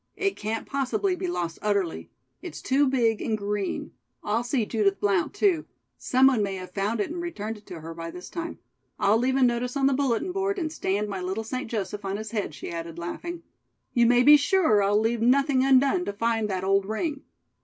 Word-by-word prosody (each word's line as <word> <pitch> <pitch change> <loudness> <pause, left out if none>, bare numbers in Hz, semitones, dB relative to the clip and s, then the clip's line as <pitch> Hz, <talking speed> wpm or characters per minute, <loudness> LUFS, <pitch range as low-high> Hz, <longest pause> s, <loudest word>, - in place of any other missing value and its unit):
It 395 0 0
can't 220 +2 -3
possibly 280 +8 0
be 365 - -4
lost 170 - -3
utterly. 200 -5 -1 0.3
It's 360 - -7
too 275 +2 +2
big 235 -4 +1
and 220 - -1
green. 205 -1 -3 0.3
I'll 220 +3 0
see 240 -2 0
Judith 205 -3 +1
Blount, 200 -4 +1
too. 395 -5 +1 0.3
Some 260 +1 +3
one 260 -5 +4
may 195 -1 -1
have 185 -1 -8
found 205 +4 -1
it 205 - -1
and 345 +1 -4
returned 225 -11 -5
it 205 - -26
to 165 -3 -8
her 165 +1 -7
by 165 0 -6
this 180 +2 -9
time. 335 -1 -5 0.4
I'll 210 +3 +3
leave 260 +2 +1
a 270 - +3
notice 245 +2 +1
on 270 - +2
the 275 - +4
bulletin 275 +5 0
board 390 +1 -1
and 320 -4 -2
stand 205 -5 -1
my 195 -2 -4
little 190 +5 -3
St. 255 +1 -4
Joseph 210 -2 -3
on 195 0 -2
his 220 0 -6
head," 205 -9 -3
she - - -7
added 165 -1 -6
laughing. 335 - -6 0.5
"You 235 -2 +4
may 245 +1 +5
be 295 +3 +9
sure 290 - +3
I'll 205 +1 +3
leave 225 +1 0
nothing 265 +2 +3
undone 275 +6 +4
to 200 - -3
find 225 0 0
that 185 -1 -2
old 195 0 +2
ring." 285 +7 -2
225 Hz, 215 wpm, -26 LUFS, 200-275 Hz, 0.5 s, be